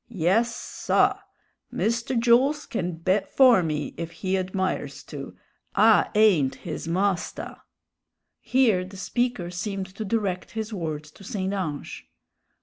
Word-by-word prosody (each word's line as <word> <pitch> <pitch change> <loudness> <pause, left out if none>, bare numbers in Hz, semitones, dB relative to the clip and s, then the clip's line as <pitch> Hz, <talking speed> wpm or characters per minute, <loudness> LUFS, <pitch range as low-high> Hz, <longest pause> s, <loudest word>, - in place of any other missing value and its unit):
Yes, 225 +4 +1
saw; - - +1 0.5
Mr. 235 +2 -1
Jools 250 +6 +3
can 180 -6 -3
bet 185 +5 0
for 255 -7 +6
me 150 -3 -2
if 165 -1 -4
he 185 +3 -2
admires 190 0 -2
to; - - -8 0.4
I - - +5
ain't 190 -11 +4
his - - -6
mostah." 185 +2 -1 0.8
Here 230 -6 +2
the 190 +1 -10
speaker 240 -3 -1
seemed 190 +1 -4
to 220 - -4
direct 195 -4 -2
his 220 0 -4
words 155 -5 -4
to 195 - -16
St. 195 -2 -3
Ange. 160 -8 -4
195 Hz, 130 wpm, -25 LUFS, 175-225 Hz, 0.8 s, for